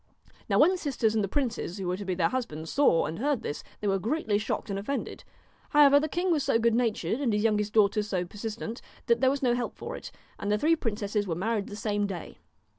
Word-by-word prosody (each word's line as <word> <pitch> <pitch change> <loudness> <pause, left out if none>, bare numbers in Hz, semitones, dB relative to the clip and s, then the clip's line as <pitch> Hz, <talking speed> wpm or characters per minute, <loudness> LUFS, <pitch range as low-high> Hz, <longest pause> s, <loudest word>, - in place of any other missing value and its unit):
Now - - +3
when 325 +5 +6
the 370 - -2
sisters 245 -8 0
and 220 -2 +1
the - - 0
princes 230 -7 -2
who 195 - -4
were 180 0 0
to 200 - -6
be 185 -1 -1
their 170 -2 +2
husbands 160 -12 -4
saw 275 - +4
and 160 +2 -5
heard 280 0 0
this, 145 - -4 0.2
they 210 - -1
were 195 -1 +2
greatly 220 - 0
shocked 210 0 -3
and 195 - -2
offended. 275 +8 -4 0.5
However, 285 -1 +7
the 310 +2 -2
king 355 +4 0
was 310 -3 +2
so - - +3
good 230 0 +2
natured, 225 - 0
and 255 -5 +1
his 210 0 +1
youngest 210 -1 +1
daughter 210 -1 +4
so 190 -4 -2
persistent, 225 +4 -6 0.2
that 235 -1 +2
there 260 - +5
was 275 +1 -2
no 245 -2 +3
help 245 0 -2
for - - -6
it, - - -8 0.3
and 205 - -2
the 210 - +3
three 315 +8 +3
princesses 210 -5 -2
were 165 - -1
married 210 +3 -1
the 205 - -7
same 205 -1 -1
day. 185 -4 -7
220 Hz, 245 wpm, -28 LUFS, 200-260 Hz, 0.5 s, However